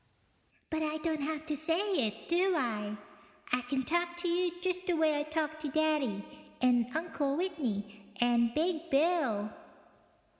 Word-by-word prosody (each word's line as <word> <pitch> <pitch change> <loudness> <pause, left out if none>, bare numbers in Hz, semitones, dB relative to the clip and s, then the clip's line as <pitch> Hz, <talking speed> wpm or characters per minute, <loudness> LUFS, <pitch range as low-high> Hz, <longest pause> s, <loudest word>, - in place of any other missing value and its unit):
(But 315 0 0
I 310 0 0
don't 315 -1 -1
have 310 +1 -3
to 305 -1 -1
say 325 +4 +2 0.3
it, 210 +1 -8
do 360 +2 +3
I? 210 -6 -2 0.6
I 250 - +4
can 265 +2 -1
talk 345 +5 0
to 350 +1 -1
you 350 +1 +2
just 365 0 -1
the 355 - +2
way 310 -2 +3
I - - +1
talk 310 0 -2
to 305 -1 -3
Daddy 290 -9 +1 0.3
and 245 -2 +4
Uncle 300 -4 -1
Whitney 220 - -2 0.2
and 235 -1 +3
Big 335 0 0
Bill). 275 -9 +2
310 Hz, 155 wpm, -32 LUFS, 245-335 Hz, 0.6 s, I